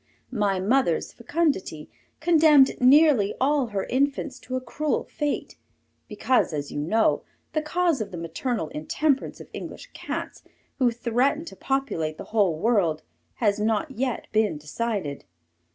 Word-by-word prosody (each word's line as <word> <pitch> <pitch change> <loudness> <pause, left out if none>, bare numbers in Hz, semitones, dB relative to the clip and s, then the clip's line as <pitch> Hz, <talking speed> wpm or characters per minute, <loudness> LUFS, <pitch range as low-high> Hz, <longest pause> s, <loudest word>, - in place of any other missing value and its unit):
My 205 -4 +1
mother's 205 -3 +1
fecundity 235 - -1 0.3
condemned 310 -5 +5
nearly 265 -5 +5
all 275 -1 +2
her 200 -3 -2
infants 275 0 -1
to 255 0 -6
a - - 0
cruel 280 +4 -2
fate, 295 -1 -3 0.5
because, 220 -2 +1
as 145 -1 -4
you - - -4
know, 215 +10 +2 0.3
the 310 - +1
cause 335 -3 +1
of 210 - -4
the 180 - -7
maternal 165 - -3
intemperance 270 - -1
of - - -10
English - - -8
cats, - - -5 0.4
who 255 -2 +4
threaten 245 +6 0
to - - -9
populate 170 - -2
the - - -7
whole 195 -8 +3
world, 180 -6 +1 0.3
has 205 0 +1
not 220 +7 0
yet 255 -1 -2
been 215 -7 +1
decided. 150 0 -3
235 Hz, 140 wpm, -25 LUFS, 195-280 Hz, 0.5 s, condemned